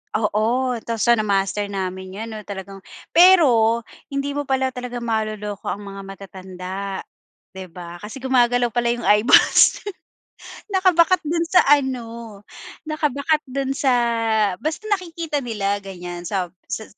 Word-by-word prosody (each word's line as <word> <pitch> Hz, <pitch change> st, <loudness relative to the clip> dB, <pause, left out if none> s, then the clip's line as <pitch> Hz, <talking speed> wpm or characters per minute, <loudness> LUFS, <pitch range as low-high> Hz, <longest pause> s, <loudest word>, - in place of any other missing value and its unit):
oo, 215 Hz, +1 st, +1 dB, 0.4 s
tapos 230 Hz, -2 st, -1 dB
so 240 Hz, -, +4 dB
na-master 205 Hz, -2 st, +1 dB
namin 190 Hz, -1 st, -5 dB
'yan, 225 Hz, +2 st, -6 dB
'no, 215 Hz, -, -6 dB
talagang 195 Hz, -1 st, -7 dB, 0.3 s
pero 255 Hz, -11 st, +5 dB, 0.2 s
hindi 275 Hz, 0 st, -3 dB
mo 290 Hz, 0 st, -4 dB
pala 265 Hz, -1 st, +1 dB
talaga 245 Hz, -1 st, -6 dB
maloloko 215 Hz, -3 st, -3 dB
ang 205 Hz, -, -3 dB
mga 195 Hz, 0 st, -8 dB
matatanda, 190 Hz, -1 st, -9 dB, 0.8 s
di 190 Hz, -1 st, -9 dB
ba? 175 Hz, 0 st, -10 dB
Kasi 220 Hz, +6 st, -9 dB
gumagalaw 245 Hz, -2 st, +2 dB
pala 240 Hz, 0 st, 0 dB
'yung 240 Hz, 0 st, -3 dB
eyeballs. 210 Hz, +4 st, +5 dB, 0.9 s
Nakabakat 370 Hz, -2 st, +3 dB
do'n 335 Hz, +2 st, -1 dB
sa 365 Hz, -, +5 dB
ano, 265 Hz, -5 st, +2 dB, 0.8 s
nakabakat 305 Hz, -1 st, 0 dB
do'n 270 Hz, +1 st, -2 dB
sa 275 Hz, -1 st, +1 dB, 0.7 s
basta 310 Hz, +7 st, -3 dB
nakikita 335 Hz, -6 st, -2 dB
nila 205 Hz, -5 st, -2 dB
ganiyan, 175 Hz, -3 st, -8 dB
sa 185 Hz, -3 st, -2 dB, 0.2 s
sa 220 Hz, -, -4 dB
230 Hz, 130 wpm, -21 LUFS, 195-280 Hz, 0.9 s, pero